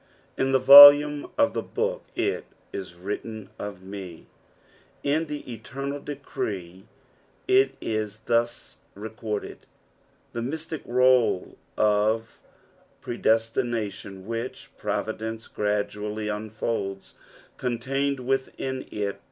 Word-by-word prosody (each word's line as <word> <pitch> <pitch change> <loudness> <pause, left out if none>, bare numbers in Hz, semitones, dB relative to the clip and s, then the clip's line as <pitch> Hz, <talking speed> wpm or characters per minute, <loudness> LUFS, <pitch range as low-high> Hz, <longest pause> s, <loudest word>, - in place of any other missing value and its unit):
" - - -34
In 135 0 0
tKa 135 - +4
volume 145 +2 +10
of 285 -1 +3
the - - -1
booh 485 +2 -2
it - - -1 0.3
u - - -3
vtritUn 100 +4 -6
of 100 -2 -7
me," 95 -3 -9 0.8
Id 155 +3 +1
the 145 -4 -6
eternal 135 +5 -5
decree 95 -10 -6 0.6
it 390 +1 +4
is 110 -1 -3
thus 120 0 -1 0.2
recorded. 105 0 -6 0.7
The 115 - -3
mystic 155 +4 -4
roll 125 -5 +3 0.2
of 110 +2 +1 0.7
tredcstination 110 -4 -1
which 115 +3 -5
providence 110 +1 -3
gradually 105 +1 -2
unfolds, 105 -2 -4 0.4
contained 135 +3 -1
witliin 130 0 -3
it. 100 -1 -3
115 Hz, 100 wpm, -25 LUFS, 105-135 Hz, 0.8 s, volume